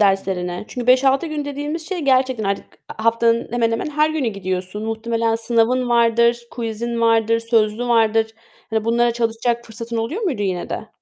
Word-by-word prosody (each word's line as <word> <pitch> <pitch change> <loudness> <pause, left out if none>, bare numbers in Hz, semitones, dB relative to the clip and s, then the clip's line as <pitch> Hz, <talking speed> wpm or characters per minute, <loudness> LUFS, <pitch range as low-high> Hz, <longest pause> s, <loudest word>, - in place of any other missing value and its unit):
derslerini? 190 -2 0
Çünkü 245 -1 -5
5-6 265 +4 +4
gün 305 -2 -3
dediğimiz 290 +3 -4
şey 375 -2 -3
gerçekten 260 -5 +2
artık 200 0 -1 0.3
a 220 - -5
haftanın 230 0 +2
hemen 235 -1 +1
hemen 230 +6 -2
her 300 +1 +2
günü 305 -6 -1
gidiyorsun. 185 0 -4
Muhtemelen 225 0 -1
sınavın 235 +2 +1
vardır, 235 0 +3
quiz'in 235 0 -3
vardır, 230 0 +3
sözlü 230 0 +1
vardır. 225 -1 +3 0.4
Hani, 220 -1 0
bunlara 235 +1 +2
çalışacak 235 +1 -1
fırsatın 230 +1 -6
oluyor 230 - -2
muydu 290 - -1
yine 185 -3 -2
de? - - -5
230 Hz, 165 wpm, -20 LUFS, 225-250 Hz, 0.4 s, 5-6